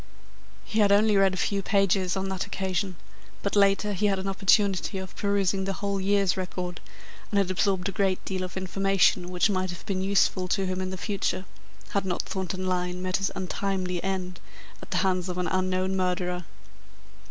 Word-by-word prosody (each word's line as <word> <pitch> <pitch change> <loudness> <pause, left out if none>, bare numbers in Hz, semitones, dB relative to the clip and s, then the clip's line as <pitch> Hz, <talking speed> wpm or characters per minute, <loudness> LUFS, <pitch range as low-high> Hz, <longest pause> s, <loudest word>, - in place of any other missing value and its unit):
He 220 - -1
had 205 -1 +5
only 210 +1 +5
read 195 -1 +4
a - - -6
few 200 +1 0
pages 195 -2 +2
on 190 0 -1
that 190 -2 -2
occasion, 190 0 -2 0.5
but 200 - -1
later 200 +1 +3
he 205 +2 +1
had 195 -1 +1
an 190 +1 -4
opportunity 195 0 +2
of 190 -1 -7
perusing 200 -1 +1
the 195 - -1
whole 200 0 -2
year's 200 -1 +2
record, 180 -1 -4 0.5
and 205 - 0
had 195 -2 +2
absorbed 190 0 +1
a - - -2
great 190 -1 0
deal 190 -1 -2
of 185 0 -5
information 190 -1 +2
which 180 +3 +2
might 185 -1 0
have 175 - -7
been 190 -2 -1
useful 190 -1 +2
to 195 +1 0
him 185 0 -2
in 185 - -2
the 190 - -5
future, 195 -1 -2 0.4
had 200 - 0
not 185 -2 -1
Thornton 185 0 -3
Lyne 180 -1 -1
met 185 0 0
his 195 0 0
untimely 185 -1 -2
end 185 -1 -3 0.4
at - - -11
the - - -1
hands 185 -1 +1
of 180 - -3
an 180 - 0
unknown 185 +1 0
murderer. 180 -1 -1
190 Hz, 190 wpm, -27 LUFS, 185-195 Hz, 0.5 s, had